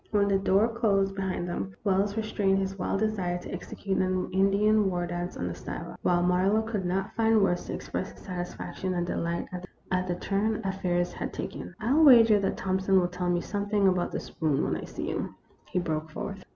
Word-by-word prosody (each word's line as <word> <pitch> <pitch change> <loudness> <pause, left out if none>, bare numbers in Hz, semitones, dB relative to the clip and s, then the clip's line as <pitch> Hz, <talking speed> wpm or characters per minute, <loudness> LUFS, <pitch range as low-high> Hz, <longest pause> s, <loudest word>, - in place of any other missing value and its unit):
When 200 -1 +2
the 195 -1 +3
door 195 +3 +3
closed 200 -4 +1
behind 190 -2 -2
them, 95 - -4
Wells 200 +1 +1
re 220 - 0
strained 195 -2 +1
his 195 0 -2
wild 195 +2 -1
desire 195 -5 0
to 180 - -8
execute 195 -1 -3
an 185 0 0
Indian 200 +2 +3
war 175 -1 -1
dance 175 +1 -4
on 90 - -2
the 90 - -3
sidewalk, 90 - -7
while 175 0 +2
Marlowe 185 +5 +3
could 215 -4 -3
not 190 +2 -1
find 225 -2 +4
words 175 -2 +1
to - - -4
express - - -4
his - - -16
satisfaction 180 0 -4
and 175 0 0
delight 170 0 -2 0.4
at 185 0 +1
the 175 - -1
turn 205 +4 0
affairs 180 -2 0
had - - -4
taken. - - -6
" - - -39
I 220 +2 -2
'11 310 +4 +5
wager 230 -6 +8
that 195 - -1
Thompson 190 0 +2
will 175 -1 +1
tell 180 0 -2
me 175 0 +1
some 205 +1 -3
thing 205 -2 +3
about 180 -2 +1
that - - -2
spoon 155 -4 -1
when - - 0
I - - -5
see - - -5
him," - - -3 0.3
he - - -3
broke 160 -3 -1
forth. 195 +4 -6
190 Hz, 215 wpm, -28 LUFS, 175-205 Hz, 0.4 s, wager